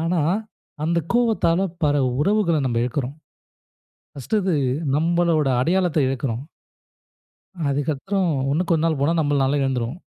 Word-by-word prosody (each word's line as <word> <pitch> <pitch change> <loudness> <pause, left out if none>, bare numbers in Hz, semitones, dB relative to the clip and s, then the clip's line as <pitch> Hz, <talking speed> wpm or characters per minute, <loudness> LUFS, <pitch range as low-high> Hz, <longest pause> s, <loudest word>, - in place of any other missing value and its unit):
ஆனா, 170 0 0 0.6
அந்த 170 +1 +1 0.2
கோவத்தால, 215 -8 +2 0.2
பல 145 0 +2 0.2
உறவுகளை 190 -3 +2
நம்ம 115 -2 0
இழக்கிறோம். 130 +2 -3 1.0
1டு 215 - -2
இது, 185 -4 +1 0.4
நம்மளோட 165 -2 +2
அடையாளத்தை 170 -1 +1
இழக்கிறோம். 130 -1 -2 1.3
அதுக்கப்பறம், 155 +6 -1 0.2
இன்னும் 170 +3 -1
கொஞ்ச 165 -1 +2
நாள் 160 -4 0
போனா, 155 +4 +2
நம்மளால 145 -1 +1
எழுந்துரும். 130 +1 -1
155 Hz, 115 wpm, -22 LUFS, 135-175 Hz, 1.3 s, கோவத்தால